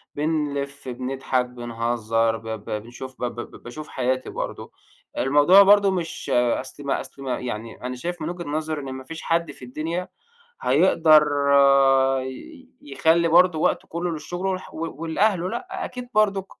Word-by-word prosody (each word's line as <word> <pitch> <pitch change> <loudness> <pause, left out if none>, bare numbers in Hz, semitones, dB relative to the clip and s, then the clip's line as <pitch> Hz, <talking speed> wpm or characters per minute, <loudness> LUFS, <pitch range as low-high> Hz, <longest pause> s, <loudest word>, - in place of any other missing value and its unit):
بنلف، 145 -3 -2
بنضحك، 130 0 -1
بنهزّر، 115 -2 -1
ب 115 +1 -12
ب 110 -2 -6
بنشوف 130 +2 -10
ب - - 0
ب 120 - -7
ب - - -14
باشوف 150 +5 -8
حياتي 130 0 -2
برضه، - - -6 0.5
الموضوع 145 +9 +6
برضه 200 0 +6
مش 170 -3 -4
أصل 125 +3 0
ما 140 - -1
أصل 140 - -12
ما 125 -2 -2
يعني 115 -2 -6
أنا 125 0 -3
شايف 170 +5 -5
من 155 - -2
وجهة 175 -1 -6
نظري، 155 0 -2
إن 135 -1 -6
ما 130 0 -7
فيش 160 +4 -8
حد 165 -2 0
في 130 - -12
الدنيا 165 +8 -4 0.6
هيقدر 155 -2 +5 1.0
ي 260 - -9
يخلّي 160 +4 +2
برضه 175 -1 +5
وقته - - 0
كُلّه 170 +1 -3
للشغل 175 +4 -5
والح 185 -1 -4
و 165 -2 -5
ولأهله 180 +2 +1
لأ، 370 - -5
أكيد 250 -1 -7
برضُك 200 -2 +2
155 Hz, 160 wpm, -23 LUFS, 125-175 Hz, 1.0 s, الموضوع